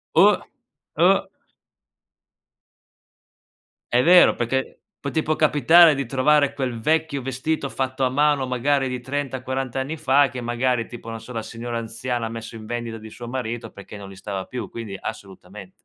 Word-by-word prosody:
Oh. - - +6 0.6
Oh. - - +4 2.6
È 125 +1 +4
vero, 180 +2 +7
perché 130 +3 -2 0.2
può 140 - -4
tipo 155 +1 0
capitare 155 +2 +6
di 140 - -2
trovare 140 +3 +3
quel 130 -5 -3
vecchio 155 0 0
vestito 135 +3 -2
fatto 130 0 -2
a 130 - +2
mano, 145 0 +2
magari 135 +2 +1
di 125 0 -3
30, 135 0 -3
40 130 -1 -4
anni 135 +5 -3
fa, 140 -1 +3
che 125 0 -6
magari 120 0 0
tipo 115 -1 -10
non 115 - -5
so, 115 +3 -11
la 115 - -2
signora 115 +1 -5
anziana 115 +1 -3
ha - - -6
messo 115 0 -8
in 110 -1 -9
vendita 120 -1 -4
di 110 0 -10
suo 120 +2 -9
marito 120 -2 -4
perché 100 +1 -11
non 100 -1 -9
li 95 - -11
stava 95 -1 -5
più, 125 -2 -6
quindi 110 -4 -7
assolutamente. 95 -2 -9
125 Hz, 165 wpm, -23 LUFS, 115-140 Hz, 2.6 s, vero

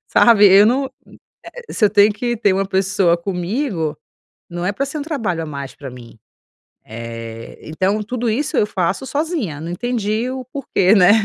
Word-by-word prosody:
sabe, 215 -3 +6
eu 195 +2 +7
não, 265 +3 +1 0.6
é, - - -10
você 210 -2 +2
tem 205 +1 +5
que 240 +3 -2
ter 210 -3 +2
uma 195 0 0
pessoa 190 -2 +2
comigo, 180 - -2 0.6
não 175 +1 -4
é 200 - 0
pra 275 - -2
ser 300 +2 -5
um - - -3
trabalho 225 - -2
a - - -5
mais 140 -3 -7
pra 135 -2 -9
mim, 120 -2 -13 0.7
eh, 115 0 -8
então, 190 +7 -1
tudo 240 +1 -2
isso 285 +7 -1
eu 210 - +3
faço 190 +6 -1
sozinha, 285 - -2
não 165 - -5
entendi 225 +3 -2
o 260 -1 -6
porquê, 215 -8 +2
né, 185 -1 +6
200 Hz, 175 wpm, -19 LUFS, 170-245 Hz, 0.7 s, eu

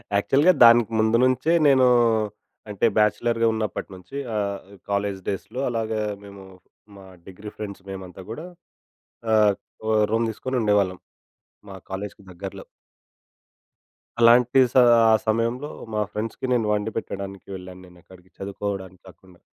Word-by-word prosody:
యాక్చువల్‌గా 140 - +4
దానికి 115 -1 +6
ముందు 110 +1 +3
నుంచే 130 +6 +2
నేను 130 -2 +5 0.8
అంటే 105 +2 -1
బ్యాచిలర్‌గా 115 +2 +2
ఉన్నప్పటి 110 -3 -4
నుంచి. 90 +8 -13 0.2
ఆహ్, 100 -1 -2 0.3
కాలేజ్ 100 -1 -1
డేస్‌లో 110 +6 -5
అలాగా 110 -2 -2 0.2
మేము 100 -1 -12 0.5
మా 95 - -13 0.2
డిగ్రీ 100 +3 -9
ఫ్రెండ్స్ 100 -2 -7
మేమంతా 95 -1 -8
గూడా 155 +9 -7 0.9
ఆహ్, 105 -2 +4 0.3
ఓహ్! 110 -1 +3
రూమ్ 115 +1 +1
తీసుకొని 130 +3 -3
ఉండేవాళ్ళం. 100 -3 +1 0.7
మా 95 - -9 0.2
కాలేజ్‌కి 100 +2 -6
దగ్గరలో. 95 +2 -8 1.6
అలాంటి 120 +2 +5
స - - -30 0.4
ఆ - - +6
సమయంలో 115 +6 0 0.2
మా 105 - 0
ఫ్రెండ్స్‌కి 110 +4 -4
నేను 120 -3 +1
వండి 105 +1 -2
పెట్టడానికి 100 -3 -6
వెళ్ళాను 90 0 -10
నేను 90 0 -18
అక్కడికి 95 0 -18
చదువుకోవడానికి 95 -2 -6
కాకుండా. 90 -1 -20
105 Hz, 125 wpm, -23 LUFS, 95-115 Hz, 1.6 s, దానికి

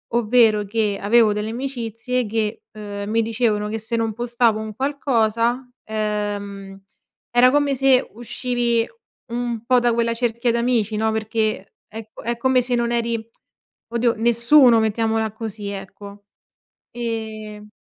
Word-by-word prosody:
ovvero 220 -2 +4
che 210 -1 -1
avevo 215 +1 +4
delle 210 +1 -3
amicizie 245 -1 -3
che, 215 0 -2
uhm, 205 -1 -6
mi 230 +1 +2
dicevano 220 -2 0
che 225 - -2
se 225 +2 -4
non 225 -1 0
postavo 240 -1 +1
un 220 0 -6
qualcosa, 245 -2 0
ehm, 205 -2 -4 0.5
era 245 +1 +5
come 290 -1 +2
se 265 0 +3
uscivi 240 0 -1 0.4
un 240 -1 -3
po' 250 0 +4
da 240 -1 +2
quella 230 0 +1
cerchia 235 0 0
d'amici, 235 -2 0
no, 220 +1 +1
perché 220 -2 -2
è 220 0 -9
co - - -10
è 235 +1 -1
come 260 +1 +3
se 245 0 -1
non 235 0 0
eri, 235 -1 -1 0.6
oddio, 235 0 +1
nessuno, 235 +2 +5
mettiamola 220 0 0
così, 215 -2 -6
ecco. 200 +1 -9 0.7
Ehm, 220 -3 -6
230 Hz, 140 wpm, -21 LUFS, 215-240 Hz, 0.7 s, era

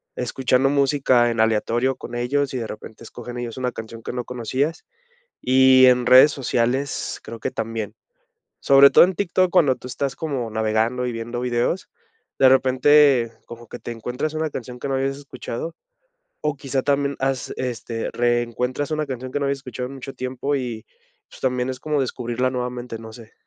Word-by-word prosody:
escuchando 130 +1 +1
música 135 -4 +3
en 115 - -4
aleatorio 115 +4 +1
con 120 - -9
ellos, 135 +3 0
y - - -2
de 115 - -4
repente, 110 +1 -10
escogen 120 +1 -9
ellos 120 -1 -5
una 125 -1 -1
canción 115 0 -9
que - - -5
no 125 -1 -4
conocías, 130 +6 -2 0.6
y 130 0 +6
en 125 -1 +4
redes 130 +4 +8
sociales, 130 +1 -1
creo 115 - -8
que - - -3
también. 110 -2 -4 0.7
Sobre 140 0 +7
todo - - +8
en 185 +1 0
TikTok 185 -1 +1
cuando 160 -8 +4
tú 125 - -10
estás 135 +1 -3
como 135 -8 -3
navegando 110 +3 0
y 125 - -2
viendo 120 +1 -5
videos, 120 -1 -1 0.5
de 130 - +7
repente, 130 -1 +4
como 120 0 -11
que 120 - -8
te 120 - -6
encuentras 125 +7 -4
una 155 0 -1
canción 125 -2 -7
que 140 - -4
no 135 - -1
habías 135 +1 -1
escuchado, 140 +2 -6 0.7
o 150 -2 0
quizá 135 -1 -2
también 140 0 +1
has 135 -3 -1
este, 115 -2 -4
reencuentras 120 +3 -1
una 155 -1 -1
canción 130 -1 -6
que - - 0
no - - -1
habías 140 0 -1
escuchado 125 -1 -6
en 135 - -9
mucho 135 +1 -8
tiempo, 130 +3 -2
y 120 -4 -4 0.5
pues, - - -15
también 125 0 0
es 130 - -7
como 150 -2 -1
descubrirla 125 -1 -1
nuevamente, 125 -2 -4
no 110 0 -10
sé. 110 -1 -13
125 Hz, 180 wpm, -22 LUFS, 120-135 Hz, 0.7 s, redes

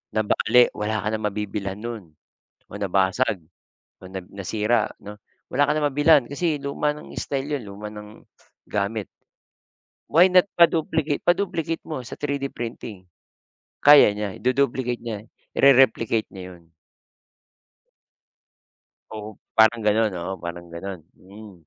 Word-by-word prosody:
Nabale 110 +3 +4
wala 105 +1 -2
ka 105 - -1
ng 110 - -6
mabibilhan 100 -1 -4
no'n, 115 -2 -6 0.6
o - - -17
nabasag, 95 +2 +1 0.6
o - - -9
na 95 - -4
nasira 105 +4 0
'no? 105 +1 -8 0.4
Wala 145 +2 +2
ka - - +3
ng 150 - +1
mabilhan 145 0 +5
kasi 155 +2 -1
luma 140 +1 -1
ng 150 - -12
style 140 +1 -3
'yon, 120 - -10
luma 100 +2 -8
ng 105 0 -12 0.4
gamit. 105 0 -2 1.0
Why 175 +5 +6
not 180 +1 +5
pa-duplicate 160 -3 +2
pa-duplicate 170 -3 0
mo 155 -5 -4
sa - - -7
3D 140 -1 -2
printing, 115 -4 -7 0.8
kaya 145 -4 +9
niya 105 -2 -4
idu-duplicate 125 -1 0
niya, 110 -4 -5 0.4
ire-replicate 115 -5 +4
niya 90 -1 -9
yun. 85 -1 -26 2.4
Oo, 110 -1 -8 0.2
parang 110 0 +4
gano'n 105 0 +2
oo, 85 +2 -4
parang 85 0 -7
gano'n, 95 +1 -6
mm, 100 +2 -14
110 Hz, 125 wpm, -23 LUFS, 100-140 Hz, 2.4 s, kaya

